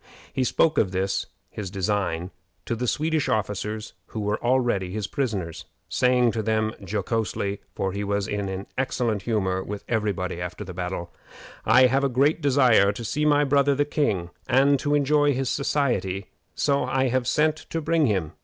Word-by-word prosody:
He 130 - +1
spoke 160 +5 +2
of 95 - +1
this 95 +1 -1 0.2
his 105 -4 -5
design 95 -2 -1 0.3
to 115 - -1
the 125 +2 -2
Swedish 155 +3 0
officers 105 +1 -2
who 110 - -6
were 105 0 -2
already 120 -7 +1
his 105 +1 -3
prisoners, 100 - -3 0.2
saying 125 -1 +3
to 110 - -2
them 110 0 0
jocosely, 100 0 -2 0.2
for 95 -1 -1
he 100 +2 -3
was 100 0 -1
in 100 -2 -3
excellent 120 -5 0
humor 95 -4 0
with 105 +1 -6
every 110 -3 +1
body 90 -2 -4
after 90 +3 -5
the 90 -2 -8
battle, 90 -1 -4 0.6
"I 130 - +7
have 135 +2 +2
a 140 - +2
great 140 +6 +2
desire 125 -8 +4
to 115 +3 -7
see 150 +7 -1
my 145 -1 +4
brother 140 0 +3
the 145 +1 +2
king, 100 - -1 0.2
and 135 +2 +4
to 145 +2 +1
enjoy 145 0 +3
his 130 0 -1
society; 120 -10 -1 0.2
so 140 -1 +1
I 130 0 +1
have 125 0 0
sent 155 +3 +2
to 165 - -2
bring 160 -1 +2
him. 95 -8 0
110 Hz, 175 wpm, -25 LUFS, 100-135 Hz, 0.6 s, I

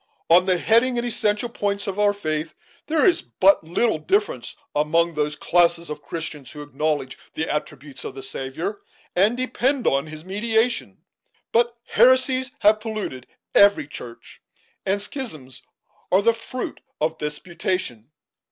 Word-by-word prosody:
On 180 +2 +6
the 185 -1 +3
heading 235 +6 +3
and 240 - -1
essential 215 -1 0
points 200 -3 -2
of 195 0 -4
our 205 0 +5
faith, 155 -5 -3 0.3
there 315 -1 +3
is 345 -2 +4
but 195 - +3
little 175 +3 +1
difference 415 - 0 0.2
among 165 +3 +2
those 150 -1 -1
classes 170 0 +2
of 150 - -6
Christians 150 -3 -6
who 150 -1 -8
acknowledge 145 -1 -2 0.2
the 160 - -1
attributes 150 -2 -5
of 130 - -6
the 135 - -8
Saviour, 135 +10 -5 0.3
and 205 +6 +3
depend 255 +1 0
on 140 +3 +2
his 155 +1 -9
mediation. 225 +5 0 0.5
But 235 +1 +2
heresies 260 0 +4
have 210 +1 +5
polluted 215 - -5 0.3
every 200 -6 +6
church, 120 -5 -10 0.5
and 195 +1 +2
schisms 200 - -7 0.5
are 190 +2 +4
the 230 - +5
fruit 235 +2 -6 0.2
of 160 +1 -1
disputation. 150 - -3
185 Hz, 145 wpm, -23 LUFS, 150-230 Hz, 0.5 s, On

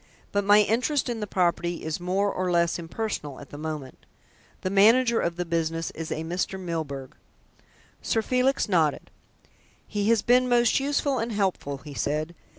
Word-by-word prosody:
"But 205 0 +1
my 205 +1 +6
interest 250 +7 +1
in 235 -2 -3
the 210 - -3
property 175 -2 0
is 160 +1 -3
more 190 +3 0
or 185 0 -1
less 170 0 +2
impersonal 165 -5 -4
at 145 - -12
the 145 - -8
moment. 150 -4 -6 0.5
The 185 - -2
manager 230 +4 +5
of 170 0 -1
the 180 0 -3
business 165 -1 -1
is 165 0 -7
a 160 - -2
Mr. 180 +3 -2
Milburgh." 155 -6 -5 0.9
Sir 225 - 0
Felix 255 +3 +1
nodded. 165 -7 +1 0.8
"He 205 0 -1
has 230 -3 +3
been 250 +1 +4
most 240 0 +4
useful 280 -1 0
and 230 +1 -2
helpful," 190 -9 -1
he 145 - -8
said. 155 +4 -2
185 Hz, 165 wpm, -26 LUFS, 160-225 Hz, 0.9 s, my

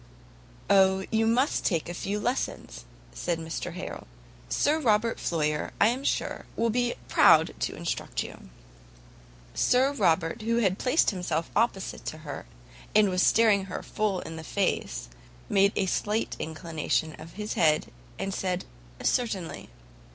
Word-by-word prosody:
"O, 190 -1 +4
you 225 0 +2
must 250 +5 +2
take 165 -5 0
a 175 - -4
few 200 +4 -3
lessons," 245 - -3 0.3
said 170 - -2
Mr 165 +1 -5
Harrel, - - -7 0.4
"Sir 300 - +2
Robert 225 -4 +2
Floyer, 150 -2 -1
I 215 - +6
am 255 +3 -2
sure, - - -1
will 230 0 +1
be 245 +1 0
proud - - +5
to - - -2
instruct - - -3
you." - - -11 1.0
Sir 260 +2 +3
Robert, 165 - +1
who 230 +2 0
had 195 -5 +1
placed 260 +2 +3
himself 170 -4 -2
opposite 210 -3 0
to 155 - -4
her, 145 - -6 0.5
and 210 -2 +6
was 180 0 +1
staring 205 -3 +4
full 195 +1 -2
in 160 0 -7
her - - -8
face, 170 - -1 0.4
made 200 0 +4
a 195 - +1
slight 210 +4 -1
inclination 160 -1 -2
of 165 +1 -11
his 210 +1 -4
head, 155 -2 +2 0.3
and 195 - -3
said, 185 -1 -2 0.4
"Certainly." 205 -9 -1
195 Hz, 145 wpm, -27 LUFS, 165-225 Hz, 1.0 s, I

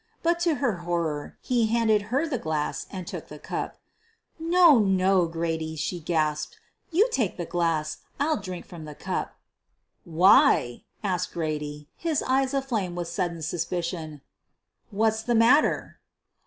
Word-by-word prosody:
But 340 +1 +2
to 340 -3 +2
her 245 -10 0
horror, 170 -4 -3
he 240 -3 +2
handed 220 -2 +3
her 275 +7 +1
the 265 -6 -2
glass 155 -2 -2
and 185 -2 -6
took - - -7
the - - -10
cup. - - -5 0.6
"No, 335 -4 +6
no, 190 -3 +3
John," 165 -1 -2
she 175 +4 -3
gasped, 155 -2 -1 0.3
"you 380 +8 +4
take 230 - 0
the 175 - -3
glass. 165 -3 -1 0.2
I'll 310 +2 +2
drink 185 -3 -7
from 170 -4 -10
the 150 -1 -9
cup." - - -4 0.7
"Why," 175 - +4 0.2
asked 180 -3 -1
Grady, 150 -2 -4
his 325 -4 -1
eyes 265 +1 +1
aflame 225 -10 -1
with 175 -1 -4
sud 175 0 -1
den 165 - -9
suspicion, 165 -2 -3 0.7
"what's 220 +1 +1
the 240 +1 0
matter?" 240 +7 +3
185 Hz, 145 wpm, -26 LUFS, 165-245 Hz, 0.7 s, No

